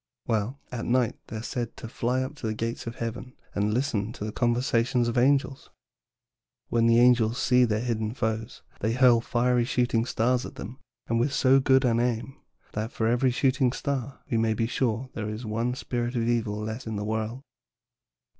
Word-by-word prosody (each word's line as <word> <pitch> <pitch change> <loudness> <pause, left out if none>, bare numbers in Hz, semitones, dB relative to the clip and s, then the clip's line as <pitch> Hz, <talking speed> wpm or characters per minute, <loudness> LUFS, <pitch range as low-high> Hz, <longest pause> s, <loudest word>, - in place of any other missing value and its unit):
"Well, 115 +5 -1
at 120 -2 -4
night 125 -1 +1
they - - -7
are 110 - -5
said 120 -1 -4
to - - -7
fly 125 +3 -1
up 130 +3 -5
to 115 - -4
the 110 - -2
gates 115 +1 -4
of 115 - -5
heaven 120 +2 -5 0.2
and 105 +1 0
listen 115 -3 -1
to 105 - -6
the 110 - -3
conversation 120 +1 +1
of 120 0 +1
the 120 - +3
angels. 135 0 +1 1.0
When 115 -1 +3
the 115 0 +5
angels 120 -1 +4
see 125 0 +4
their 110 -1 0
hidden 110 -2 -2
foes, 110 0 -3 0.2
they 110 +2 0
hurl 125 -2 +5
fiery 120 +1 +1
shooting 120 -1 +1
stars 125 +2 +1
at - - -8
them 120 +6 -8 0.3
and 115 0 0
with 130 +4 +1
so 135 0 +5
good 130 0 +4
an 115 -1 +2
aim 120 +2 -1 0.4
that 110 +2 -3
for 110 - -2
every 120 +3 +3
shooting 130 0 +2
star 135 -1 -3
we 115 - 0
may 110 -1 +1
be 115 - 0
sure 125 +1 -1
there 110 -1 -4
is 110 +3 -5
one 115 +3 -1
spirit 120 -1 -3
of 115 - +1
evil 115 -3 0
less 110 +3 -5
in 110 - -3
the 105 0 -3
world." 110 +4 -3
120 Hz, 200 wpm, -27 LUFS, 110-125 Hz, 1.0 s, the